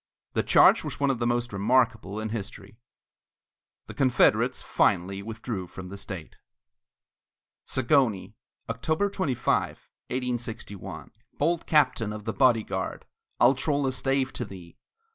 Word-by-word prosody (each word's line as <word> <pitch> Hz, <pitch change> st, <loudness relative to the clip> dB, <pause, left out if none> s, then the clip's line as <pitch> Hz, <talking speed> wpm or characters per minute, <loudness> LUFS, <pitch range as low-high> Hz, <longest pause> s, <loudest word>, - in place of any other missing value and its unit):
The -, -, +2 dB
charge -, -, +5 dB
was -, -, -6 dB
one 140 Hz, -1 st, +3 dB
of 125 Hz, -, -3 dB
the 120 Hz, -, 0 dB
most 120 Hz, -1 st, -1 dB
remarkable 110 Hz, -1 st, +1 dB
in 110 Hz, 0 st, -3 dB
history. 105 Hz, -1 st, -7 dB, 1.1 s
The -, -, -9 dB
Confederates 130 Hz, -4 st, +3 dB
finally 95 Hz, +3 st, +1 dB
withdrew 110 Hz, -3 st, -5 dB
from 90 Hz, +1 st, -9 dB
the 100 Hz, -, -7 dB
state. 95 Hz, -5 st, -8 dB, 1.3 s
ZAGONYI 125 Hz, -7 st, +1 dB, 0.3 s
[October 155 Hz, -, -1 dB
25, 155 Hz, -, +1 dB, 0.5 s
1861] 120 Hz, -5 st, -5 dB, 0.3 s
Bold 170 Hz, +3 st, 0 dB
Captain 130 Hz, -8 st, +3 dB
of 105 Hz, 0 st, -7 dB
the 110 Hz, 0 st, -3 dB
Body 120 Hz, -5 st, +4 dB
Guard, 95 Hz, -2 st, -4 dB, 0.3 s
I'll 120 Hz, +2 st, +6 dB
troll 140 Hz, +1 st, 0 dB
a 130 Hz, -, +1 dB
stave 135 Hz, 0 st, 0 dB
to -, -, -3 dB
thee! 95 Hz, -5 st, -11 dB
120 Hz, 130 wpm, -27 LUFS, 100-130 Hz, 1.3 s, I'll